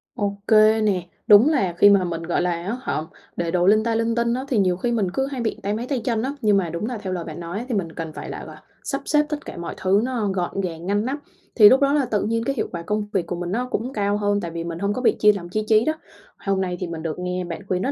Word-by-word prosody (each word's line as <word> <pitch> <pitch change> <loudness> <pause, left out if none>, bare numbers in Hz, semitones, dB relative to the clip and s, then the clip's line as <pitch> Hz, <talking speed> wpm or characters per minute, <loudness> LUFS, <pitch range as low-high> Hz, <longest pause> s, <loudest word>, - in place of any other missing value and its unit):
Ô 200 -1 -2
kê 220 0 +5
nè. 200 -4 +1 0.2
Đúng 210 +7 +8
là 195 - +1
khi 205 - +7
mà 200 -2 +5
mình, 170 -2 -3
gọi 170 +1 0
là 180 0 +1
á 175 +7 -3
hả, 155 - -2 0.4
để 170 -1 -1
đồ 180 0 +2
linh 215 +2 +5
ta 230 0 0
linh 230 0 0
tinh 235 0 +1
á, 260 +2 -3
thì 260 -5 0
nhiều 185 -3 +2
khi 240 +6 -1
mình 205 -6 0
cứ 270 +7 -1
hay 270 -3 -4
bị 225 - -2
táy 200 +1 -1
máy 225 +3 -3
tay 275 -4 0
chân 230 -3 0
á, 270 +2 -2
nhưng 210 -2 +4
mà 180 -4 0
đúng 170 +5 -3
là 245 0 -3
theo 190 -3 -4
lời 175 -2 -3
bạn 160 0 -8
nói 175 +7 -5
thì 240 - 0
mình 175 -5 -2
cần 160 -1 -6
phải - - -7
là - - -6
là - - -11 0.2
sắp 275 -1 -3
xếp 300 0 +3
tất 300 -1 -4
cả - - -8
mọi 170 - -5
thứ 195 +2 +2
nó 245 -4 -1
gọn 190 +1 -2
gàng 170 -2 -5
ngăn 205 +3 0
nắp. 270 +3 -2 0.4
Thì 210 -3 +9
lúc 265 +2 +4
đó 280 0 +3
là 290 -3 +2
tự 215 -4 -1
nhiên 230 +2 0
cái 275 +3 -1
hiệu - - -1
quả 170 - -5
công 210 +4 -2
việc 185 -4 +1
của 180 - -3
mình 175 0 -4
nó 245 +5 -1
cũng 250 +3 -2
cao 205 -2 0
hơn 205 -1 0
tại 170 - -5
vì 165 0 -4
mình 170 0 -5
hông 200 +2 0
có 255 - -3
bị 250 - +3
chia 210 - +6
lòng 175 -4 -7
chia 215 +4 -1
trí 220 0 +4
đó. 310 - +2 0.4
Hôm 195 -2 -1
nay 180 -1 -2
thì 180 - -3
mình 165 -1 -6
được 165 0 -4
nghe 180 0 -2
bạn 175 +1 -6
khuyên 185 -1 0
rất 265 - 0
205 Hz, 310 wpm, -23 LUFS, 180-230 Hz, 0.4 s, Thì